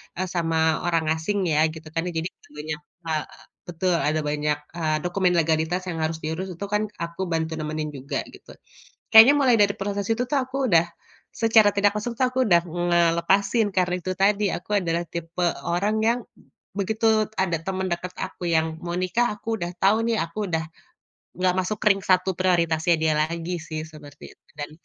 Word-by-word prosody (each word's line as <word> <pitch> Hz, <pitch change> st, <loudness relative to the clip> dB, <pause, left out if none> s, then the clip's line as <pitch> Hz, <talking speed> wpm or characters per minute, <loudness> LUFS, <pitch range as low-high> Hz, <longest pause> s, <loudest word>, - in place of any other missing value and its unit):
eee, 185 Hz, +1 st, -2 dB
sama 160 Hz, -2 st, +1 dB
orang 165 Hz, -2 st, +1 dB
asing 175 Hz, +5 st, -1 dB
ya, 155 Hz, +1 st, +4 dB
gitu 160 Hz, 0 st, -9 dB
kan. 165 Hz, +2 st, -2 dB
Ya -, -, -2 dB
jadi, 165 Hz, +3 st, -3 dB
eee, -, -, -25 dB
banyak 150 Hz, 0 st, -4 dB, 0.3 s
ha 160 Hz, -, -2 dB, 0.5 s
betul, 175 Hz, +1 st, -1 dB
ada 155 Hz, +1 st, +1 dB
banyak, 150 Hz, 0 st, -1 dB, 0.2 s
eee, 155 Hz, -2 st, 0 dB
dokumen 180 Hz, 0 st, +1 dB
legalitas 160 Hz, +2 st, +1 dB
yang 165 Hz, -2 st, -3 dB
harus 160 Hz, +1 st, -1 dB
diurus, 160 Hz, +4 st, -3 dB
itu 200 Hz, -, -5 dB
kan 210 Hz, +1 st, +1 dB, 0.2 s
aku 170 Hz, +2 st, -6 dB
bantu 160 Hz, 0 st, -1 dB
nemenin 155 Hz, 0 st, -3 dB
juga 140 Hz, +1 st, -4 dB
gitu. -, -, -14 dB, 0.6 s
Kayaknya 225 Hz, +5 st, +9 dB
mulai 260 Hz, -4 st, +4 dB
dari 200 Hz, -1 st, +4 dB
proses 200 Hz, 0 st, -2 dB
itu 225 Hz, -, -1 dB
tuh, 285 Hz, -, +1 dB
aku 260 Hz, +1 st, -6 dB
udah 170 Hz, -4 st, +5 dB, 0.5 s
secara 220 Hz, -2 st, +4 dB
tidak 205 Hz, +1 st, +2 dB
langsung 215 Hz, +3 st, -3 dB
tuh, 255 Hz, -, +3 dB
aku 255 Hz, +1 st, +1 dB
udah 175 Hz, -7 st, +5 dB
ngelepasin. 175 Hz, +5 st, +2 dB
Karena 180 Hz, -1 st, +1 dB
itu 185 Hz, +2 st, -3 dB
tadi, 200 Hz, +2 st, +3 dB
aku 180 Hz, -, -6 dB
adalah 170 Hz, -1 st, -1 dB
tipe 170 Hz, +1 st, -6 dB, 0.2 s
orang 190 Hz, +5 st, 0 dB
yang 235 Hz, +2 st, +3 dB, 0.5 s
b 200 Hz, -, -4 dB
begitu 220 Hz, +3 st, -3 dB, 0.3 s
ada 185 Hz, -3 st, +1 dB
temen 190 Hz, +2 st, -3 dB
deket 180 Hz, +1 st, -4 dB
aku 185 Hz, -2 st, -5 dB
yang 160 Hz, -1 st, +2 dB, 0.2 s
mau 175 Hz, 0 st, -3 dB
nikah, 185 Hz, +7 st, +1 dB
aku 225 Hz, 0 st, -4 dB
udah 175 Hz, 0 st, -2 dB
tahu 195 Hz, +3 st, +4 dB
nih, 230 Hz, -, +1 dB
aku 165 Hz, +4 st, -10 dB
udah 160 Hz, -2 st, -1 dB, 0.7 s
nggak 185 Hz, 0 st, +2 dB
masuk 185 Hz, +3 st, -1 dB
ring 195 Hz, -2 st, +5 dB
satu 185 Hz, 0 st, +2 dB
prioritasnya 170 Hz, -2 st, +2 dB
dia 160 Hz, -1 st, +3 dB
lagi 165 Hz, +3 st, -1 dB
sih, 155 Hz, -1 st, -5 dB
seperti 145 Hz, -1 st, -13 dB
itu. -, -, -61 dB, 0.2 s
Dan 145 Hz, 0 st, -5 dB
175 Hz, 185 wpm, -24 LUFS, 160-200 Hz, 0.7 s, Kayaknya